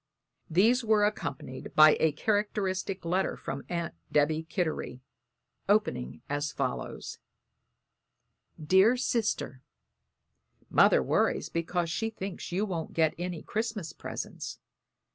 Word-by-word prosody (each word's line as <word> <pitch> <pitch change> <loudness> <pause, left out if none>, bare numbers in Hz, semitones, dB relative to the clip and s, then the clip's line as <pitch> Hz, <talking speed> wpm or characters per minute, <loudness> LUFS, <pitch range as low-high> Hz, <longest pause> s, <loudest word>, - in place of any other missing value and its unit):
These 225 +9 +4
were 215 -2 +4
accompanied 135 -10 -4
by 155 0 +8
a 160 - +3
characteristic 195 0 -1
letter 185 +3 0
from 135 - -5
Aunt 170 -1 -2 0.2
Debby 155 +2 +2
Kittery, 160 -8 -2 0.7
opening 65 +4 +1
as 145 +1 -2
follows: 130 -2 -4 1.4
"DEAR 190 +10 +5
SISTER: 215 - -1 1.1
"Mother - - +5
worries - - +1
because 170 0 -1
she 225 +5 -1
thinks 195 -5 -6
you 190 +4 0
won't 170 -6 -4
get 160 -2 +3
any 175 -2 -4
Christmas 220 -6 -3
presents. - - -6
175 Hz, 105 wpm, -29 LUFS, 155-210 Hz, 1.4 s, by